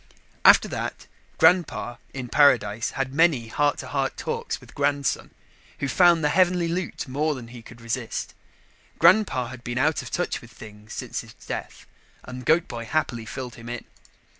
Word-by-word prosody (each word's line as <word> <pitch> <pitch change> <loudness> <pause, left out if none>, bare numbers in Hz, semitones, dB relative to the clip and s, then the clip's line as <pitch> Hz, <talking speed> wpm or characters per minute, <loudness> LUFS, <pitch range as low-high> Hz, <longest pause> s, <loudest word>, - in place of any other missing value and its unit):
After - - +7
that, - - -4 0.3
Grandpa 160 -8 +3
in 130 -2 -6
paradise 115 -6 +3
had 135 -1 -2
many 145 -7 +3
heart 145 +4 +1
to - - -7
heart 135 -1 -1
talks - - -3
with - - -16
Grandson, 140 -1 0 0.5
who 140 - -2
found 170 +1 +4
the 150 - +3
heavenly 180 +1 +3
loot 170 -2 -3
more 150 +4 0
than 120 -3 -9
he 120 -1 -10
could 120 +1 -14
resist. 115 0 -4 0.6
Grandpa 170 - +4
had 130 -1 -10
been 120 0 -4
out 150 +4 +2
of - - -8
touch 175 +2 -2
with 120 - -14
things 105 -2 -12
since - - -4
his - - -15
death - - -7 0.4
and 125 0 -8
Goat 160 +2 +4
boy 115 -2 -6
happily 120 -5 -1
filled 125 -1 -6
him 115 +1 -10
in. 120 -1 -5
135 Hz, 170 wpm, -25 LUFS, 120-160 Hz, 0.6 s, After